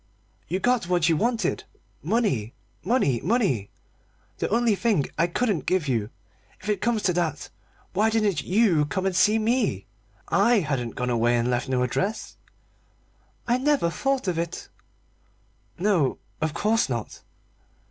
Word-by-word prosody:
"You 185 +4 -1
got 240 -5 +1
what 175 -2 +2
you 165 - +3
wanted 225 0 0 0.4
money, 170 - 0 0.3
money, 170 - +1
money 155 - 0 0.7
the - - -1
only 230 +1 +2
thing 200 - +1
I 165 +2 +2
couldn't 200 0 -1
give 180 -5 +1
you. 115 -5 -1 0.5
If - - -7
it 205 -3 0
comes 235 -3 0
to 180 - +2
that, 165 -4 -2 0.4
why 210 +4 +3
didn't 215 -7 +1
you 185 -6 +2
come 190 +5 -2
and 190 -2 0
see 205 +4 +4
me? 220 - 0 0.4
I 215 +2 +3
hadn't 130 -7 -3
gone 125 0 -2
away 120 +1 +2
and 120 +1 0
left 125 +1 -1
no 125 -1 +1
address." 195 - -2 1.1
"I 240 +1 +2
never 275 - +2
thought 270 +3 -1
of 175 -2 0
it." 170 0 -5 1.1
"No, 180 -7 +1 0.2
of 155 -1 -1
course 220 -3 +1
not." 115 -4 -5
185 Hz, 145 wpm, -25 LUFS, 145-220 Hz, 1.1 s, see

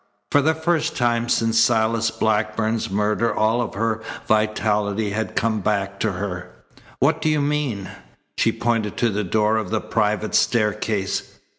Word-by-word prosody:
For 145 - +5
the 160 +3 +2
first 160 0 0
time 120 -1 +1
since 115 -1 +2
Silas 115 -1 +2
Blackburn's 110 +1 0
murder 105 +3 +1
all 110 +3 +1
of 120 - -4
her 110 +1 -1 0.3
vitality 105 -1 +1
had 110 +2 -3
come 110 -1 +1
back 100 -1 -1
to 110 -3 0
her. 90 -1 -5 0.5
"What - - +2
do 155 - +1
you 155 -1 +2
mean?" 140 -9 -1 0.5
She - - +2
pointed 115 -3 -1
to 120 -2 +2
the 105 +1 -1
door 105 +3 +1
of 110 -4 -3
the 110 - 0
private 105 +1 -1
staircase. 105 -3 0
110 Hz, 155 wpm, -22 LUFS, 105-115 Hz, 0.5 s, For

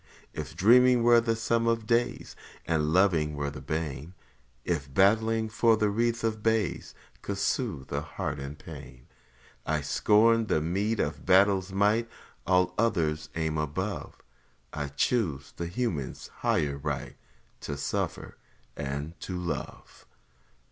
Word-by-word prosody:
If 75 -1 -6
dreaming 125 +3 +5
were 120 0 +6
the 115 -1 0
sum 115 0 0
of 115 -1 +1
days, 120 +1 0 0.3
And 80 -2 0
loving 80 -5 +3
were 70 -1 -2
the 70 - -9
bane; 80 +2 -4 0.5
If 75 -6 -2
battling 110 +6 +3
for 115 0 +3
a 105 - +3
wreath 115 +2 0
of 110 -1 -1
bays 110 -4 -1 0.3
Could 100 - -4
soothe 100 - -2
a 70 - 0
heart 75 -1 -4
in 70 +1 -6
pain, 70 -5 -11 0.6
I 75 -1 -1
'd - - -9
scorn 110 +7 +3
the 80 - +2
meed 100 +8 -1
of 75 0 -2
battle's 95 0 +4
might, 105 +4 +2 0.4
All 90 0 +3
other 85 -10 +2 0.2
aims 80 -1 -1
above 95 +7 -4 0.6
I 75 -1 -3
'd 70 - -15
choose 85 - 0
the 85 - -4
human's 90 - -3
higher 70 -2 0
right, 75 -2 -4 0.4
To 70 - -5
suffer - - -3 0.4
and 70 +4 -5
to 90 - -5
love! 90 -2 -6
90 Hz, 140 wpm, -28 LUFS, 75-110 Hz, 0.6 s, were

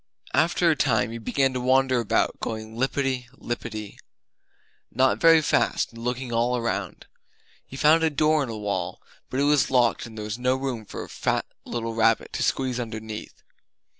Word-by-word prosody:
After 170 +2 +3
a - - +2
time 115 -6 +1
he 115 - -6
began 135 +4 +1
to 125 - -2
wander 130 0 +3
about, 115 - 0
going 110 0 -5
lippity 130 0 -1
lippity 110 -3 -5 0.9
not 130 0 +2
very 165 -1 +6
fast 150 - +1
and 115 0 -10
looking 125 0 -3
all 120 +2 +1
around. 100 -6 -3 0.6
He 135 - -9
found 155 +3 +5
a 160 - +3
door 155 +1 +2
in 135 - -2
a 110 - -5
wall; 100 -4 -3 0.3
but 130 - -2
it - - +3
was 145 -2 +3
locked 120 -2 +2
and 110 -1 -12
there 105 - -5
was 105 +2 -4
no 125 +1 +2
room 130 -5 -4
for - - -7
a - - -10
fat - - -1 0.2
little 115 -1 -3
rabbit 115 0 +2
to - - -3
squeeze 130 -2 0
underneath. 110 -2 -7
125 Hz, 180 wpm, -25 LUFS, 115-135 Hz, 0.9 s, very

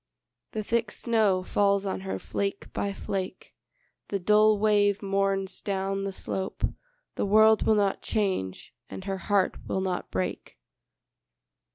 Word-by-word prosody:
The 215 - -2
thick 230 +1 0
snow 210 -6 +1
falls 200 +1 +2
on 195 - -2
her 190 0 -3
flake 200 0 -4
by 200 - -1
flake, 195 -1 -5 0.5
The 200 - -1
dull 210 +3 +4
wave 205 -1 +3
mourns 195 -1 0
down 195 0 -2
the 195 - -2
slope, 190 0 -4 0.5
The - - 0
world 220 +2 +5
will 220 - +5
not 200 -2 +1
change, 190 - -2 0.2
and 190 - -7
her 195 -1 -3
heart 200 -2 +2
will - - -1
not 185 -1 -2
break. 95 -8 -4
200 Hz, 140 wpm, -27 LUFS, 190-210 Hz, 0.5 s, world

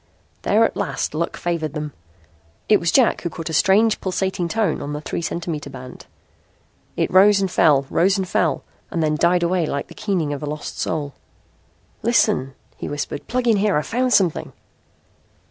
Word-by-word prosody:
There 220 +3 +3
at - - -2
last 200 -6 -2
luck 170 +2 -2
favored 165 -4 -2
them. 150 -2 -5 0.7
It 210 - +5
was 170 - 0
Jack 255 -4 +3
who 170 - -3
caught 165 0 -6
a - - -5
strange 210 +7 +3
pulsating 185 -1 -1
tone 210 -3 0
on 145 - -4
the 150 - -3
three 155 - -4
centimeter 165 -3 -4
band. 130 -2 -11 0.9
It - - 0
rose 200 +2 +6
and 195 -2 -1
fell, 145 -6 +4
rose 190 +7 +2
and 190 -1 -2
fell, - - 0 0.3
then 155 -2 0
died 175 +3 +2
away 170 -1 +1
like 140 -1 -3
the - - -11
keening 180 -8 -1
of 140 - -6
a 150 - -4
lost 150 0 -6
soul. 145 -3 -2 0.9
"Listen," 130 +1 +2 0.2
he - - -5
whispered. 145 0 -5
"Plug 250 0 -1
in 225 -3 +4
here. 200 -3 +2
I've 150 - -1
found 250 +2 0
something." 185 -8 +2
170 Hz, 180 wpm, -21 LUFS, 150-195 Hz, 0.9 s, rose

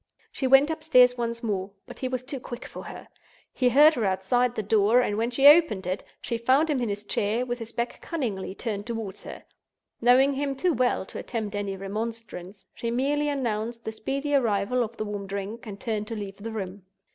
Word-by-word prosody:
She 265 - -2
went 270 +4 +6
upstairs 290 -6 +4
once 235 0 -3
more; 195 -4 -2 0.2
but - - -11
he 260 - -2
was 255 -1 -3
too 275 +1 -5
quick 245 0 -8
for - - -9
her—he 250 -2 -4
heard 295 +6 +7
her 240 -6 -2
outside 210 +6 +1
the 215 - -2
door; 215 +3 +4
and 225 -4 +1
when 225 +2 0
she 270 +3 0
opened 290 - +7
it, 185 +2 -2 0.2
she 235 - -3
found 270 +7 +3
him 270 -4 0
in 235 - -1
his 205 +1 -4
chair, 215 +5 0
with 245 0 -3
his 230 0 -7
back 235 +1 -4
cunningly 215 - -3
turned 205 -2 -4
toward 225 -4 -5
her. - - -9 0.6
Knowing 255 +4 +5
him 275 0 -2
too 350 +5 +1
well 245 -6 +1
to - - -8
attempt 220 -4 -4
any 200 -1 -3
remonstrance, 205 -1 -6
she 235 - -4
merely 285 +5 0
announced 230 -4 -2
the 220 - -2
speedy 275 +6 -3
arrival 235 -2 +2
of 230 +1 -7
the 215 - -3
warm 205 -1 -5
drink 200 +5 -5
and 200 -1 -7
turned 215 -1 -3
to 225 - -4
leave 200 -2 -6
the 220 +3 -6
room. 200 -2 -5
230 Hz, 205 wpm, -26 LUFS, 205-255 Hz, 0.6 s, heard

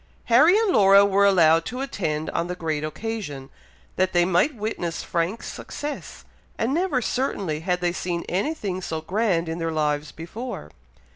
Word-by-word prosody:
Harry 315 - +7
and 440 -3 +2
Laura 200 0 +7
were 200 0 +4
allowed 165 -4 +5
to 250 +7 -5
attend 160 - -2
on 170 +1 -1
the 180 - -4
great 160 -4 -2
occasion, 155 -6 -5 0.5
that 185 0 +1
they 175 -1 +4
might 185 - +2
witness 205 -6 -3
Frank's 175 +6 -2
success; 295 0 -7 0.3
and 235 +4 0
never, 320 -7 0
certainly, 200 - -1
had 180 +2 -1
they 175 -1 +1
seen 175 -2 -3
any 200 - -1
thing 190 -9 -4
so 160 -3 -4
grand 180 -1 0
in 165 +1 -4
their 165 0 -1
lives 150 -1 -1
before! 165 - -7
180 Hz, 165 wpm, -24 LUFS, 165-225 Hz, 0.5 s, Harry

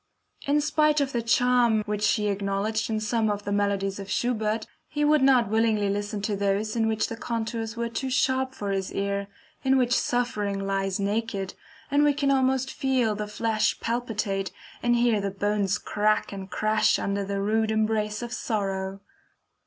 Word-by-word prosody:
In 295 +1 +3
spite 305 0 +2
of 280 -1 0
the 240 - -1
charm 235 -1 +3
which 210 0 +1
he 210 -2 0
acknowledged 200 +2 -1
in 220 -1 0
some 220 0 0
of 205 0 -2
the 205 - -4
melodies 200 -1 0
of 195 0 -7
Schubert, 220 -1 0 0.2
he 295 -1 -1
would 300 -1 +4
not 260 -4 +5
willingly 220 -2 +2
listen 205 0 -3
to 210 -1 0
those 200 +2 0
in 225 -1 +2
which 220 -1 +1
the 230 - -5
contours 230 0 -3
were 235 0 -1
too 260 +3 -3
sharp 260 0 +1
for 205 -5 -3
his 195 -1 -2
ear, 200 0 -1 0.4
in 265 0 +4
which 245 -2 +2
suffering 210 -5 0
lies 195 -1 -1
naked, 200 -1 -2 0.4
and 285 +1 +4
we 295 -1 +3
can 280 -1 +1
almost 265 -1 +1
feel 255 -5 +1
the 210 0 -4
flesh 215 0 0
palpitate, 215 -5 -2 0.3
and 240 0 +3
hear 235 -3 +2
the 200 - -1
bones 200 0 0
crack 215 +1 0
and 195 -1 -7
crash 215 +2 +2
under 200 0 -1
the 200 0 -3
rude 220 +2 +1
embrace 215 0 0
of 240 0 -5
sorrow. 195 -4 -2
215 Hz, 175 wpm, -26 LUFS, 200-240 Hz, 0.4 s, not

